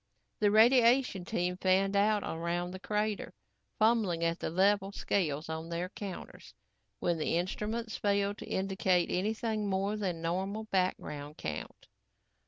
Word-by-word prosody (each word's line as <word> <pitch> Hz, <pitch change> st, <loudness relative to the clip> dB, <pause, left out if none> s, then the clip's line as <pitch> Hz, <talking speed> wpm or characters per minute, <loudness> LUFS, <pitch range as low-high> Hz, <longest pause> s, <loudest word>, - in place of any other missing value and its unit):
The 210 Hz, -, +4 dB
radiation 235 Hz, -2 st, +5 dB
team 180 Hz, +1 st, -1 dB
fanned 190 Hz, +2 st, +2 dB
out 210 Hz, +1 st, +3 dB
around 170 Hz, +2 st, -2 dB
the 185 Hz, -, -7 dB
crater, 210 Hz, +1 st, -2 dB, 0.4 s
fumbling 215 Hz, -7 st, +2 dB
at 170 Hz, +1 st, 0 dB
the -, -, -2 dB
level 195 Hz, +3 st, +2 dB
scales 160 Hz, -7 st, -1 dB
on 160 Hz, +1 st, -5 dB
their 170 Hz, +2 st, -3 dB
counters 185 Hz, -, -8 dB, 0.4 s
when 170 Hz, +8 st, 0 dB
the 155 Hz, -, +1 dB
instruments 215 Hz, +5 st, -3 dB
failed 200 Hz, 0 st, 0 dB
to -, -, -8 dB
indicate 190 Hz, -2 st, +1 dB
anything 215 Hz, +2 st, -1 dB
more 195 Hz, +2 st, 0 dB
than 185 Hz, -5 st, -2 dB
normal 190 Hz, +6 st, -2 dB
background 155 Hz, -7 st, -2 dB
count. 80 Hz, 0 st, -6 dB
190 Hz, 135 wpm, -31 LUFS, 175-210 Hz, 0.4 s, radiation